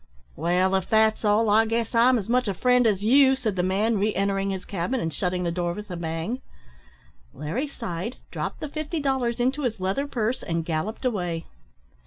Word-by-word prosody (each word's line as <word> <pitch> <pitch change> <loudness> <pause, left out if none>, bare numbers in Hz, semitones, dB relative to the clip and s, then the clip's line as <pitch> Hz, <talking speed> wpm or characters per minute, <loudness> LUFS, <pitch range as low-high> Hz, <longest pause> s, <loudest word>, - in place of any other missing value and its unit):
"Wall, 180 +2 +1
if 190 -1 0
that's 220 0 +3
all, 215 +2 +3
I 220 +2 +5
guess 230 +1 -1
I'm 245 +2 +5
as 200 - -4
much 250 0 +2
a 195 - -1
friend 250 +3 +3
as 200 -2 +1
you," 265 +4 +6
said 230 -7 -2
the 180 - +1
man, 200 +4 +1
re 210 +1 +1
entering 195 0 0
his 190 -1 -4
cabin, 200 +7 -2
and 165 -5 -2
shutting 180 +2 -1
the 170 - 0
door 175 0 -1
with 210 +1 -8
a - - -3
bang. 165 +8 -3 0.9
Larry 165 - -3
sighed, 190 -3 -5
dropped - - -4
the 305 - -3
fifty 310 +2 -4
dollars 265 -4 0
into 260 +4 +1
his 240 -6 -2
leather 195 +10 -1
purse, 240 -2 -1
and 165 -1 -2
galloped 170 +10 -3
away. 175 -8 -1
210 Hz, 200 wpm, -25 LUFS, 180-245 Hz, 0.9 s, you